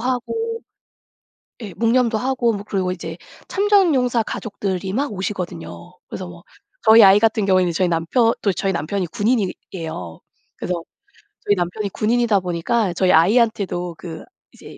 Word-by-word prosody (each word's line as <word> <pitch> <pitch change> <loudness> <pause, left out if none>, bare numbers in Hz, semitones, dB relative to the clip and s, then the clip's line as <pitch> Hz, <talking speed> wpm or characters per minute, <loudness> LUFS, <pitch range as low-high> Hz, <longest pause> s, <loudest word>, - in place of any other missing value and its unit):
하고 450 - -2 1.0
예 195 -5 -7
묵념도 230 +1 +2
하고 250 -2 0
뭐 200 - -6
그리고 190 -3 -1
이제 165 -2 -7 0.3
참전용사 330 - +3
가족들이 195 -3 -4
막 270 0 -1
오시거든요. 180 -2 -6
그래서 185 - -6
뭐 175 -1 -13 0.4
저희 220 0 +8
아이 195 0 +8
같은 220 -2 +2
경우에는 185 -3 +3
저희 180 +2 +1
남편 175 +8 +2
또 200 - +2
저희 195 +1 -1
남편이 175 +4 -2
군인이에요. 180 - -3 0.4
그래서 175 -2 -3 0.6
저희 205 - +3
남편이 180 +4 -2
군인이다 225 +1 +1
보니까 180 +3 -1
저희 185 +1 +2
아이한테도 190 -2 +2
그 165 -3 -8 0.3
이제 - - -13
200 Hz, 335 characters per minute, -20 LUFS, 180-230 Hz, 1.0 s, 저희